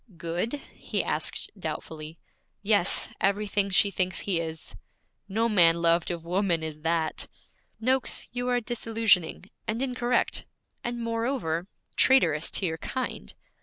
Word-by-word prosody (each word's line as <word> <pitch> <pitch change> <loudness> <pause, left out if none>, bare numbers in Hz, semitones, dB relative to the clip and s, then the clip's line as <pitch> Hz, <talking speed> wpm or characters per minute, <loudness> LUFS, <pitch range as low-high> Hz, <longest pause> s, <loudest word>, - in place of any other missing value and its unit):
'Good?' 170 - -2 0.2
he - - -2
asked - - -1
doubtfully. 155 0 -6 0.5
'Yes, 205 -3 +3
everything 200 0 +1
she 200 +1 +5
thinks 185 -1 0
he 185 -4 0
is.' 160 -9 -5 0.5
'No 225 +4 +1
man 175 -7 +6
loved 170 0 +3
of 170 -2 -4
woman 175 -2 +1
is 155 -1 -6
that.' 165 0 0 0.5
'Noakes, 255 +3 +1
you 245 +1 -2
are 245 0 +3
disillusioning, 220 -6 +1 0.2
and 220 +2 -1
incorrect, 250 -2 0 0.4
and 240 -1 -3
moreover 230 -8 -1 0.3
traitorous 165 - +5
to 195 - 0
your 160 -2 -2
kind.' 65 - -4
195 Hz, 130 wpm, -27 LUFS, 165-230 Hz, 0.5 s, man